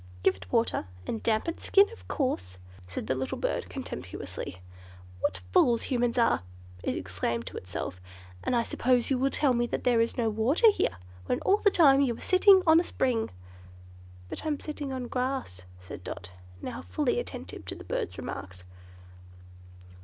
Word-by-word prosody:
"Give -, -, +4 dB
it 95 Hz, -1 st, -13 dB
water, 115 Hz, -2 st, +1 dB, 0.2 s
and 225 Hz, -, -3 dB
damp 220 Hz, +3 st, +1 dB
its 335 Hz, -, -4 dB
skin, 400 Hz, +1 st, +6 dB
of 460 Hz, -, -13 dB
course," 90 Hz, -, -2 dB, 0.3 s
said 90 Hz, +3 st, -5 dB
the 120 Hz, -, 0 dB
little 130 Hz, 0 st, -3 dB
Bird, -, -, -2 dB
contemptuously. 90 Hz, -, -6 dB, 0.6 s
"What 95 Hz, -1 st, -1 dB
fools 235 Hz, -2 st, +4 dB
Humans 245 Hz, -1 st, 0 dB
are," 230 Hz, -, +3 dB, 0.4 s
it -, -, -1 dB
exclaimed 95 Hz, +6 st, -2 dB
to -, -, -7 dB
itself. 90 Hz, 0 st, -5 dB, 0.4 s
"And -, -, +1 dB
I 235 Hz, -, +3 dB
suppose 245 Hz, +2 st, +1 dB
you 260 Hz, -, +2 dB
will 270 Hz, +1 st, +3 dB
tell 275 Hz, -2 st, +2 dB
me 240 Hz, 0 st, +1 dB
there 240 Hz, -1 st, +2 dB
is 230 Hz, -, -1 dB
no 235 Hz, -2 st, +1 dB
water 245 Hz, -, +4 dB
here, 95 Hz, -, -1 dB, 0.3 s
when -, -, +1 dB
all 395 Hz, -, +4 dB
the 420 Hz, -, +4 dB
time 280 Hz, -7 st, +6 dB
you 240 Hz, -4 st, +1 dB
are -, -, -12 dB
sitting 380 Hz, 0 st, +6 dB
on 320 Hz, 0 st, +7 dB
a -, -, +1 dB
spring." 245 Hz, -9 st, 0 dB, 1.0 s
"But -, -, -6 dB
I'm 305 Hz, -2 st, -1 dB
sitting 295 Hz, -2 st, -5 dB
on 260 Hz, -1 st, -3 dB
grass," 250 Hz, -, -2 dB, 0.2 s
said 90 Hz, 0 st, -9 dB
Dot, 90 Hz, 0 st, -6 dB, 0.3 s
now -, -, -5 dB
fully 90 Hz, +2 st, 0 dB
attentive -, -, -7 dB
to -, -, -5 dB
the -, -, -10 dB
bird's -, -, -3 dB
remarks. 90 Hz, -2 st, -7 dB
240 Hz, 175 wpm, -29 LUFS, -, 1.0 s, on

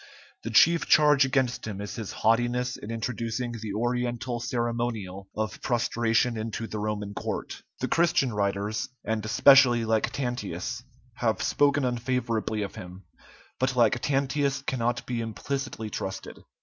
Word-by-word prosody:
The 115 Hz, -, -5 dB
chief 165 Hz, +9 st, +5 dB
charge 150 Hz, -2 st, +6 dB
against 130 Hz, -3 st, 0 dB
him 100 Hz, -2 st, -5 dB
is 100 Hz, 0 st, -5 dB
his 110 Hz, -4 st, -5 dB
haughtiness 120 Hz, +2 st, +1 dB
in 105 Hz, -, -9 dB
introducing 115 Hz, +1 st, -3 dB
the 110 Hz, -3 st, -5 dB
Oriental 120 Hz, +1 st, -1 dB
ceremonial 115 Hz, -6 st, -3 dB
of 110 Hz, -3 st, -3 dB
prostration 120 Hz, -1 st, +1 dB
into 110 Hz, +1 st, -4 dB
the 110 Hz, -1 st, -5 dB
Roman 105 Hz, -1 st, -3 dB
court. -, -, -5 dB, 0.2 s
The -, -, 0 dB
Christian 160 Hz, -7 st, +2 dB
writers, 100 Hz, +1 st, -1 dB, 0.2 s
and 110 Hz, 0 st, -1 dB
especially 120 Hz, +2 st, +6 dB
Lactantius, 115 Hz, -1 st, -2 dB, 0.4 s
have 115 Hz, -2 st, 0 dB
spoken 145 Hz, -1 st, +2 dB
unfavorably 120 Hz, -3 st, -1 dB
of 100 Hz, -, -6 dB
him; 90 Hz, +1 st, -10 dB, 0.6 s
but 130 Hz, 0 st, +1 dB
Lactantius 135 Hz, +4 st, +1 dB
cannot 120 Hz, -1 st, -1 dB
be 120 Hz, -2 st, -2 dB
implicitly 115 Hz, 0 st, -4 dB
trusted. 95 Hz, -1 st, -5 dB
120 Hz, 130 wpm, -27 LUFS, 110-125 Hz, 0.6 s, charge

